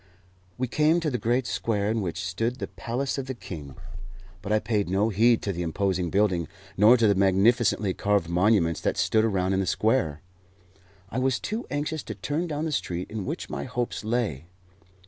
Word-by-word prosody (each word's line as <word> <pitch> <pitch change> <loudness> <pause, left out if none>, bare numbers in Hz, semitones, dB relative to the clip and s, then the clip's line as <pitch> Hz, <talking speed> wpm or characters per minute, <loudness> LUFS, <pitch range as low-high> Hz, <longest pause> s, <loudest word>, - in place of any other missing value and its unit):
We 130 - -1
came 155 +6 +3
to 155 -3 -1
the 125 - -1
great 120 +4 +1
square 105 -4 -1
in 110 0 0
which 90 -1 -3
stood 115 +7 -1
the - - -3
palace 130 +4 -3
of 135 - -5
the 130 - -4
king, 75 - -8 0.7
but 105 - -5
I 110 - +4
paid 105 -4 -1
no 100 +4 +2
heed 115 +3 +3
to 100 - -1
the 90 - -4
imposing 90 +1 -1
building 95 -4 +1 0.3
nor 110 +6 +6
to 115 - +3
the 100 - +5
magnificently 100 +2 +3
carved 100 -4 +1
monuments 90 -1 +2
that - - -1
stood 110 -1 +2
around 95 -4 +1
in 95 - +1
the 95 - -1
square. 105 - +1 0.9
I - - -1
was 130 -1 +1
too 220 +4 -4
anxious 150 +2 -2
to 110 - -6
turn 150 - -2
down 150 0 -3
the 160 - -2
street 90 -10 -3
in 105 -4 -4
which - - -4
my 70 - -4
hopes 120 -2 -3
lay. 105 - -2
105 Hz, 195 wpm, -26 LUFS, 95-125 Hz, 0.9 s, nor